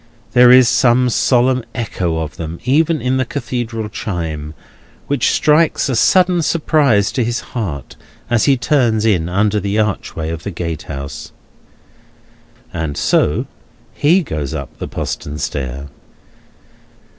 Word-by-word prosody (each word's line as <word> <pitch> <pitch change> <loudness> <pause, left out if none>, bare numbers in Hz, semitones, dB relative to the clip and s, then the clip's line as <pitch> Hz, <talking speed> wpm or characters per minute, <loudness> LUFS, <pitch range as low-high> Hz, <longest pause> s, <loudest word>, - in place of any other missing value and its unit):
There 125 +1 +6
is 125 0 +7
some 125 0 +3
solemn 125 +1 +2
echo 95 -8 -2
of 80 -2 -5
them 80 0 -6
even 155 +4 +2
in 130 +1 0
the 130 - +1
Cathedral 120 -4 -4
chime, 80 -7 -5 0.5
which 140 -4 +1
strikes 155 -1 +2
a 130 - 0
sudden 180 +8 +3
surprise 145 -10 +2
to 125 - 0
his 120 +1 -2
heart 80 - -5 0.3
as 120 -2 +2
he 140 -2 +4
turns 120 -6 +1
in 90 -7 +1
under 105 +3 +1
the 100 +1 -2
archway 100 -6 -2
of 80 -1 -5
the 100 - -5
gatehouse. 80 -6 -6 1.4
And 75 -3 -3
so - - +1 0.5
he 175 +6 +3
goes 75 - -4
up - - -7
the - - -4
postern 75 +1 -5
stair. 70 -1 -4
110 Hz, 135 wpm, -17 LUFS, 80-130 Hz, 1.4 s, is